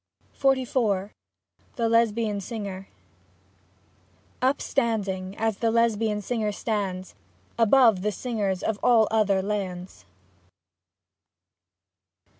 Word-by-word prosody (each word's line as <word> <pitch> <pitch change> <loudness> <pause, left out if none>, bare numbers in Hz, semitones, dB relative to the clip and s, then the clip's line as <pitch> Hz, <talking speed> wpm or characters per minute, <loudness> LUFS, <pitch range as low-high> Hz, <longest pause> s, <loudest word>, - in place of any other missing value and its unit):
XLIV 250 -7 +1 0.6
THE 230 -3 0
LESBIAN 225 -2 +1
SINGER 195 -3 -6 1.5
Upstanding, 210 -8 -1
as 220 -2 -1
the 230 - +1
Lesbian 225 -2 +1
singer 220 -1 -1
stands 195 -4 -3 0.5
Above 230 -3 +5
the 210 +2 0
singers 205 -4 -2
of 215 -2 -1
all 230 -3 +4
other 200 -3 +2
lands. 185 - -5
215 Hz, 80 wpm, -25 LUFS, 195-230 Hz, 1.5 s, Above